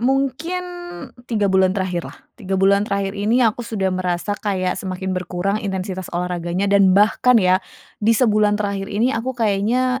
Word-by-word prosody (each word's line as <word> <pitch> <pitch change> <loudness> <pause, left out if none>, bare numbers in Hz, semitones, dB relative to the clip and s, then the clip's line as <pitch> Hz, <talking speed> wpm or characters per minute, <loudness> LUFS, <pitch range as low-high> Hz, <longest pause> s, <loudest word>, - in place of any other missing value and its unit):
mungkin 275 +8 -1 0.6
3 210 -4 +1
bulan 190 -1 +3
terakhirlah. 180 -3 -3 0.2
3 195 -4 -3
bulan 200 +2 +3
terakhir 200 -1 -1
ini 225 +5 +2
aku 225 +1 +1
sudah 195 -4 -1
merasa 185 +2 -2
kayak 185 -3 -1
semakin 190 0 -4
berkurang 185 +2 -2
intensitas 190 -2 -4
olahraganya, 175 +1 -2
dan 195 -2 +5
bahkan 225 +4 +4
ya, 185 -3 +4 0.4
di 225 +2 +3
sebulan 210 -3 +3
terakhir 200 -1 -3
ini 225 +5 +1
aku 255 +2 -3
kayaknya 235 +4 +1
200 Hz, 150 wpm, -20 LUFS, 185-225 Hz, 0.6 s, dan